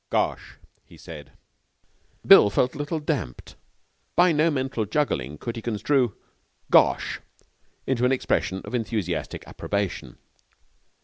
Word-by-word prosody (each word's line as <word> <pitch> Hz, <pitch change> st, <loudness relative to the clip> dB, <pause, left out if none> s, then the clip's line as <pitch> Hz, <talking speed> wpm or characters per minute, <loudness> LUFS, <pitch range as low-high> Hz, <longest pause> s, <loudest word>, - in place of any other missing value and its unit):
'Gosh!' -, -, -1 dB, 0.3 s
he -, -, -17 dB
said. 75 Hz, -3 st, -11 dB, 0.9 s
Bill 105 Hz, -, +8 dB
felt 125 Hz, +5 st, +1 dB
a -, -, -9 dB
little 150 Hz, +2 st, -2 dB
damped. 135 Hz, -, -4 dB, 0.6 s
By 175 Hz, 0 st, +5 dB
no 155 Hz, +1 st, +3 dB
mental 130 Hz, -6 st, -2 dB
juggling 75 Hz, -, -1 dB
could 115 Hz, +9 st, -5 dB
he 115 Hz, -, -6 dB
construe 120 Hz, +2 st, 0 dB, 0.6 s
'Gosh!' -, -, +3 dB, 0.7 s
into 125 Hz, -2 st, 0 dB
an 125 Hz, -, +3 dB
expression 95 Hz, -7 st, -1 dB
of -, -, -9 dB
enthusiastic 110 Hz, -7 st, -3 dB
approbation. 100 Hz, -2 st, -4 dB
120 Hz, 120 wpm, -25 LUFS, 100-145 Hz, 0.9 s, Bill